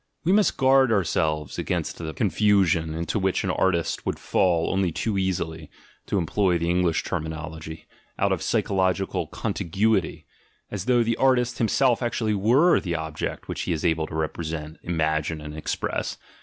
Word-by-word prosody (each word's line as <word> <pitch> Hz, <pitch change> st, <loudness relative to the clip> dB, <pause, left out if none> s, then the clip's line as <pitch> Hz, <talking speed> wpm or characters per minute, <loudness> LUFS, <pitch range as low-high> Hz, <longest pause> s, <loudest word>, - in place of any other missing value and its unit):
We 170 Hz, -, +2 dB
must 205 Hz, +1 st, +3 dB
guard 130 Hz, -1 st, +4 dB
ourselves 80 Hz, -7 st, 0 dB
against -, -, -2 dB
the 80 Hz, -2 st, -4 dB
confusion, 95 Hz, -6 st, +2 dB
into 85 Hz, +6 st, -2 dB
which 95 Hz, -1 st, 0 dB
an -, -, 0 dB
artist 85 Hz, -3 st, +1 dB
himself -, -, -35 dB
would -, -, -1 dB
fall 85 Hz, -3 st, +1 dB
only 95 Hz, -2 st, +1 dB
too 105 Hz, +6 st, -2 dB
easily 85 Hz, -5 st, -2 dB, 0.4 s
(to -, -, 0 dB
em 90 Hz, -, 0 dB
ploy 95 Hz, 0 st, +2 dB
the 85 Hz, +1 st, 0 dB
English 90 Hz, -2 st, +1 dB
terminology) 80 Hz, -1 st, -5 dB, 0.3 s
out -, -, +1 dB
of -, -, 0 dB
psychological 95 Hz, 0 st, 0 dB
"con -, -, -3 dB
tiguity"; 95 Hz, 0 st, 0 dB, 0.5 s
as 100 Hz, -2 st, -4 dB
though 120 Hz, -2 st, +3 dB
the 115 Hz, 0 st, 0 dB
artist' 125 Hz, -2 st, +2 dB
himself 120 Hz, +2 st, +2 dB
actually 115 Hz, -2 st, 0 dB
were 125 Hz, -, +4 dB
the 85 Hz, -4 st, -3 dB
object 80 Hz, -1 st, -4 dB
which -, -, -4 dB
he -, -, +2 dB
is 80 Hz, +2 st, -3 dB
able 80 Hz, -2 st, +1 dB
to -, -, -8 dB
represent, 80 Hz, 0 st, -4 dB
imagine, 80 Hz, -1 st, -1 dB
and 75 Hz, 0 st, -8 dB
express. 80 Hz, -, -3 dB
90 Hz, 170 wpm, -25 LUFS, 80-105 Hz, 0.5 s, guard